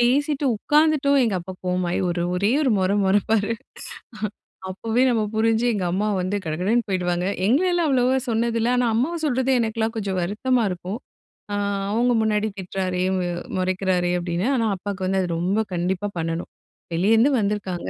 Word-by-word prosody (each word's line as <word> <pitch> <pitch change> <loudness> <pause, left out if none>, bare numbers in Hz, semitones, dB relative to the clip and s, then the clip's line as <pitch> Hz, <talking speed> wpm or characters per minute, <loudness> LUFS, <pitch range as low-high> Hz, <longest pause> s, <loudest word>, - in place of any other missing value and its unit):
பேசிட்டு 285 +4 +2
உட்காந்துட்டோம், 295 +2 +3
எங்க 220 -4 0
அப்பா 185 +2 -8
கோவமாயி, 180 -1 0
ஒரு 175 0 -1
ஒரே 200 +4 +1
ஒரு 270 - +2
மொற 185 0 +1
மொறைப்பாரு. 205 +3 +2 1.2
அப்போவே 225 +5 -1
நம்ம 230 -3 +2
புரிஞ்சு, 225 +1 +2
எங்க 195 -4 -1
அம்மா 200 +4 0
வந்து 185 +3 -2
கடகடன்னு 185 +10 0
போயிடுவாங்க. 180 -1 0 0.2
எங்களலாம் 345 - +2
அவ்வளவா 260 -1 +3
சொன்னது 230 0 0
இல்ல. 230 - +1
ஆனா, 245 -1 +2
அம்மாவ 270 +9 0
சொல்றது, 260 -2 +1
எனக்கெல்லாம் 225 0 -1
கொஞ்சம் 195 -3 -2
வருத்தமா 235 +7 0
இருக்கும். 180 +5 -5 0.5
அ, - - 0 0.4
அவங்க 240 +3 +2
முன்னாடி 215 0 +1
திட்றாரே, 185 -1 -2
அ - - +1 0.4
முறைக்கிறாரே, 185 -1 0
அப்டீன்னு. 175 +4 -2
ஆனா, 230 -3 +1
அப்பாக்கு 195 0 -5
வந்து, 190 0 +1
அது 180 - -2
ரொம்ப 195 +5 +1
கண்டிப்பா 180 +3 -1
பண்ணணும். 165 +1 -3 0.4
வெளியருந்து 225 +9 +4
வந்துருக்காங்க, 200 -4 -2
210 Hz, 150 wpm, -23 LUFS, 185-240 Hz, 1.2 s, வெளியருந்து